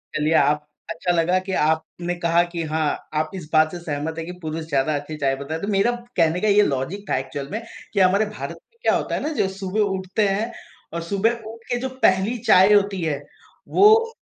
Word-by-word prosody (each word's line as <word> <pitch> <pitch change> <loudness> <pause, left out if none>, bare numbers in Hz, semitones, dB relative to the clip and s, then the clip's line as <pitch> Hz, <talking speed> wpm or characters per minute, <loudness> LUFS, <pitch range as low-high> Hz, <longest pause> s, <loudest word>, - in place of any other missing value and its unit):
चलिए 155 +2 +1
आप 150 +1 +3 0.2
अच्छा 170 +2 -1
लगा 175 +2 +2
कि 190 +1 -6
आपने 160 +2 0
कहा 170 0 +3
कि 170 -1 -2
हाँ, 155 -2 -1
आप 155 +1 0
इस 160 -4 -8
बात 155 0 +4
से 175 - -6
सहमत 155 -1 -4
हैं 165 - -4
कि 180 - -6
पुरुष 160 0 -4
ज़्यादा 140 +2 +1
अच्छी 145 +2 -5
चाय 135 -2 +1
बताए, 145 +4 -5
तो 200 - -4
मेरा 200 +3 +2 0.3
कहने 165 +1 +3
का 215 - +1
ये 205 0 +5
लॉजिक 165 +7 -1
था - - +2
एक्चुअल 135 +1 -5
में 220 +3 -3 0.3
कि 200 - +1
हमारे 190 +3 +4
भारत 210 0 -6 0.2
में 465 - -34
क्या - - +3
होता - - -1
है - - -2
ना? 305 - -1
जो 195 - +1
सुबह 190 +2 -4 0.2
उठते 190 +3 0
हैं 205 +4 -1 0.4
और 170 - -3
सुबह 200 +6 +1 0.2
उठ 230 0 -15
के 245 - +2
जो 260 - -3
पहली 190 +6 +3
चाय 190 +3 +7
होती 200 -2 +2
है 155 -4 -1 0.5
वो 445 +3 +5
175 Hz, 220 wpm, -22 LUFS, 155-200 Hz, 0.5 s, चाय